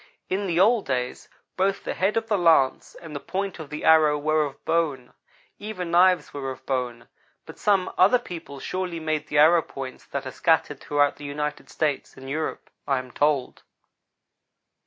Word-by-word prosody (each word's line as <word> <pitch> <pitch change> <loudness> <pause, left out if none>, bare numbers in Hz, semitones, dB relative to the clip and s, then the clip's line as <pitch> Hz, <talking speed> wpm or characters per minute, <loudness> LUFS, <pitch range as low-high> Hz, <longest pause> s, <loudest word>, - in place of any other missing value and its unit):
In 195 +1 -1
the 170 -1 0
old 215 +2 +4
days, 125 -2 -3 0.3
both 195 +1 0
the - - -3
head 195 +4 0
of 225 - 0
the 220 -2 +1
lance 165 -8 +3
and 160 -3 -10
the - - -3
point 195 +3 -4
of 155 -3 -8
the 150 0 -6
arrow 155 -2 +5
were 155 +1 +1
of 140 - -10
bone; 145 -7 -1 0.5
even 195 -5 -5
knives 180 -2 +4
were 135 -2 -4
of 130 0 -8
bone, 125 -3 -3 0.4
but - - -12
some 195 -3 +2
other 195 +7 +6
people 170 - -9
surely 180 +2 -3
made 155 -1 -2
the 150 - -2
arrow 160 +3 +6
points 135 -4 -8
that 140 -1 -4
are 130 - -5
scattered 155 -2 +1
throughout 145 -1 +1
the 145 - -9
United 150 +1 -4
States 150 -3 -2
and 135 - -10
Europe, 155 +2 -4 0.2
I 135 - +2
am 130 -1 -6
told. 145 -2 0
155 Hz, 180 wpm, -25 LUFS, 140-180 Hz, 0.5 s, other